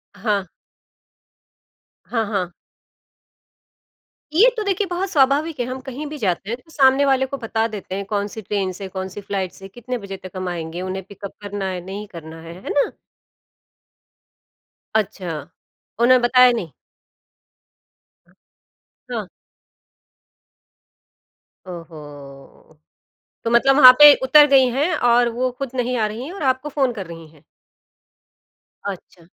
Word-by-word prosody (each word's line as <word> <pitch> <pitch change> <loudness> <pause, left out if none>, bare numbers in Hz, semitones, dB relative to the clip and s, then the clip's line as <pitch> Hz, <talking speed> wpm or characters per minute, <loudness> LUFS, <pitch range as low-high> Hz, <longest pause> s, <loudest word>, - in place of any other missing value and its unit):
हाँ। 205 -1 -1 1.6
हाँ, 225 -2 -1
हाँ। 180 -3 -2 1.8
ये 435 +10 +6
तो 435 - -1
देखिए 400 0 -1
बहुत 365 +2 -3
स्वाभाविक 290 -1 +2
है, 245 - 0
हम 255 +1 -5
कहीं 275 +4 -6
भी 300 +1 -7
जाते 195 -2 -2
हैं 235 - -2
तो 320 - -22
सामने 275 -1 +4
वाले 265 -1 +2
को 275 +1 -6
बता 225 -1 -1
देते 205 -3 -7
हैं 200 0 -4
कौन-सी 205 +1 -3
ट्रेन 195 -2 -2
से, 190 +1 -8
कौन-सी 190 +1 -6
फ्लाइट 195 -2 -3
से 195 - -12
कितने 245 +4 -6
बजे 195 -3 -8
तक 185 -1 -11
हम 185 0 -4
आएँगे। 170 0 -5
उन्हें 185 +1 -4
पिकअप 200 0 -9
करना 205 -1 -5
है, 180 -1 -4
नहीं 200 +2 -7
करना 165 -3 -11
है, 165 0 -10
है - - -7
ना? 285 - +1 2.0
अच्छा। 175 -8 -2 0.5
उन्हें 255 +1 +6
बताया 250 +1 +6
नहीं? 200 -10 -4 2.4
हाँ। - - -3 2.4
ओहो! 150 -4 -12 0.7
तो 230 - -1
मतलब 265 +3 +4
वहाँ 255 -3 +11
पे 295 -1 +10
उतर 295 +3 +7
गई 270 -2 +5
हैं 290 +8 0
और 240 -2 +3
वो 255 +2 -1
खुद 275 -2 -4
नहीं 250 0 -1
आ 215 - +1
रही 220 +4 -6
हैं 325 - -7
और 395 - -8
आपको 260 +2 0
फ़ोन 270 -4 0
कर 195 -5 -7
रही 165 -1 -10
हैं? 155 -2 -23 1.5
अच्छा। 180 -3 -10
220 Hz, 140 wpm, -21 LUFS, 185-265 Hz, 2.4 s, वहाँ